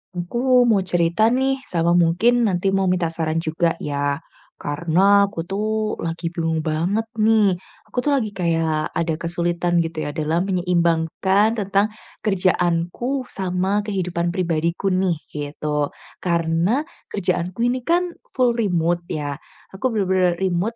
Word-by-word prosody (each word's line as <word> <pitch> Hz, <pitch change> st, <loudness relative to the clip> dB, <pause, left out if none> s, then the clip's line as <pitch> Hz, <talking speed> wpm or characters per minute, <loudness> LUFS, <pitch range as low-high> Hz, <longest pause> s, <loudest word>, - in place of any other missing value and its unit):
Aku 245 Hz, +7 st, +2 dB
mau 205 Hz, -4 st, +3 dB
cerita 175 Hz, +5 st, +2 dB
nih 265 Hz, +1 st, 0 dB
sama 170 Hz, -5 st, +1 dB
mungkin 180 Hz, +9 st, +3 dB
nanti 195 Hz, -3 st, +1 dB
mau 195 Hz, -, +2 dB
minta 180 Hz, -2 st, +1 dB
saran 160 Hz, 0 st, -1 dB
juga 165 Hz, +1 st, 0 dB
ya, 145 Hz, -1 st, -1 dB, 0.4 s
karena 175 Hz, +7 st, +3 dB
aku 200 Hz, -4 st, -3 dB
tuh 215 Hz, +2 st, -1 dB
lagi 165 Hz, +1 st, -3 dB
bingung 165 Hz, -1 st, -1 dB
banget 170 Hz, +8 st, -1 dB
nih. 215 Hz, -3 st, +4 dB, 0.3 s
Aku 245 Hz, -, -2 dB
tuh 290 Hz, -, +1 dB
lagi 220 Hz, -7 st, 0 dB
kayak 165 Hz, -3 st, 0 dB
ada 165 Hz, -1 st, -1 dB
kesulitan 175 Hz, +1 st, 0 dB
gitu 165 Hz, -1 st, -2 dB
ya 145 Hz, -, -3 dB
dalam 160 Hz, +3 st, 0 dB
menyeimbangkan 180 Hz, +3 st, +1 dB
tentang 200 Hz, -1 st, +1 dB, 0.4 s
kerjaanku 185 Hz, +7 st, 0 dB
sama 190 Hz, +1 st, 0 dB
kehidupan 175 Hz, -3 st, -1 dB
pribadiku 170 Hz, +1 st, 0 dB
nih, 185 Hz, -1 st, +1 dB, 0.2 s
gitu. 150 Hz, 0 st, -2 dB, 0.3 s
Karena 170 Hz, -, +1 dB, 0.2 s
kerjaanku 180 Hz, +1 st, -2 dB
ini 255 Hz, -, -1 dB
kan 345 Hz, +7 st, +1 dB, 0.2 s
full 250 Hz, -2 st, +3 dB
remote 175 Hz, -6 st, 0 dB
ya. 145 Hz, -2 st, -4 dB, 0.3 s
Aku 230 Hz, +5 st, -2 dB
benar-benar 185 Hz, -3 st, +2 dB
remote 190 Hz, +5 st, 0 dB
180 Hz, 135 wpm, -22 LUFS, 165-205 Hz, 0.4 s, nih